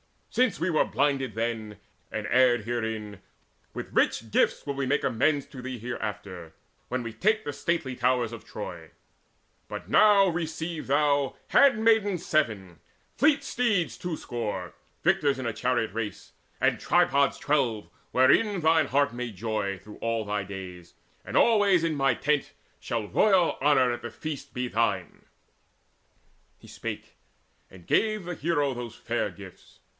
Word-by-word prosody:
Since 245 -9 +1
we 175 - +1
were 155 - +3
blinded 135 -2 0
then, 110 -2 -3 0.3
and 110 -1 -4
erred 125 -3 +4
herein, 110 -3 -4 0.5
With - - -7
rich 115 -1 +1
gifts - - +2
will 140 - -2
we 135 0 -2
make 145 +3 +1
amends 140 +4 +1
to 130 - -10
thee 130 0 -5
Hereafter, 100 -7 -6 0.3
when 125 0 -2
we 115 - -5
take 215 - +1
the 145 - -4
stately 145 -2 -2
towers 125 -2 +1
Of 115 - -9
Troy: 85 -6 -8 0.8
but - - -7
now 205 -2 +6
receive 165 -1 -4
thou 140 -1 +2
handmaids 220 - +4
seven, 105 - -1 0.4
Fleet 285 -1 +3
steeds 235 -9 0
two 175 -2 -4
score, 115 -4 -4 0.3
victors 140 -2 +2
in 120 -4 -3
chariot 120 -4 0
race, 110 -3 -5 0.3
And - - +2
tripods 140 0 +2
twelve, 130 -8 0 0.2
wherein 180 - +3
thine 160 0 +3
heart 140 -1 +2
may 120 -1 -4
joy 105 -1 -3
Through 105 +2 -13
all 115 -1 -2
thy 105 -1 -2
days; 90 -3 -9 0.3
and - - -6
always 205 -6 +4
in 165 -1 +1
my 135 -4 +2
tent 150 +2 0 0.3
Shall 115 -3 -3
royal 185 - +3
honour 135 -3 +4
at 120 0 -4
the 120 - -5
feast 155 +3 -7
be 125 0 -2
thine." 105 -6 -1 1.3
He - - -16
spake, - - -7 0.5
and 90 -3 -15
gave 215 -2 +1
the 175 +1 -5
hero 145 -4 0
those 120 -2 -7
fair - - -2
gifts. - - -14
130 Hz, 150 wpm, -27 LUFS, 110-160 Hz, 1.3 s, now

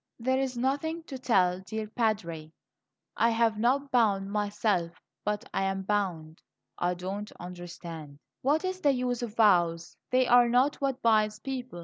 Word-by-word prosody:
"There 260 +2 0
is 260 -2 -2
nothing 290 +6 -1
to 270 -5 -8
tell, 185 -7 +2
dear 215 +4 -5
Padre; 200 -9 -2 0.6
I 230 - +3
have 225 -2 +1
not 275 +5 +1
bound 200 -5 +2
myself, 205 -4 -1 0.2
but 210 +4 -2
I - - 0
am 195 0 -2
bound." 180 -6 -2 0.4
"I 180 0 0
don't 195 +4 -5
understand 170 -4 -9
" - - -60
"What 300 +7 +1
is 370 0 -3
the 285 -5 +4
use 250 -1 -1
of 230 -3 -5
vows? 175 -6 +3
They 255 0 +3
are 245 0 +5
not 255 +4 +3
what 270 -1 -1
binds 215 -2 +3
people. 255 -6 -6
215 Hz, 160 wpm, -29 LUFS, 185-255 Hz, 0.6 s, are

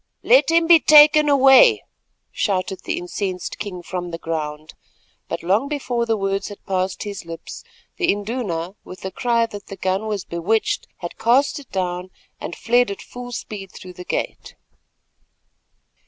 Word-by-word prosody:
"Let - - +5
him 330 0 +4
be 335 0 +7
taken 300 0 +7
away," 280 - +6 0.5
shouted 190 -2 -1
the - - -2
incensed 180 +1 -4
king 190 -4 -6
from 180 0 -5
the 165 - -5
ground, 155 -2 -5 0.6
but - - -4
long 200 +10 +1
before 250 -5 -2
the 225 -1 +1
words 195 0 -1
had 205 - -11
passed 185 -1 -2
his 205 -2 -6
lips 165 0 -9 0.3
the 360 - +2
Induna, 200 -5 -3
with 185 - -11
a 190 - -3
cry 235 +3 +1
that 205 -3 -10
the 195 - -8
gun 190 +3 -1
was 210 -3 -3
bewitched, 185 +7 -1
had 175 - -7
cast 255 +7 +2
it 280 - -15
down 180 -1 -3 0.3
and 170 - -6
fled 245 0 +2
at 200 - -5
full 245 0 -9
speed 205 -5 -7
through 180 -1 -11
the 180 - -9
gate. - - -4
200 Hz, 160 wpm, -21 LUFS, 180-245 Hz, 0.6 s, be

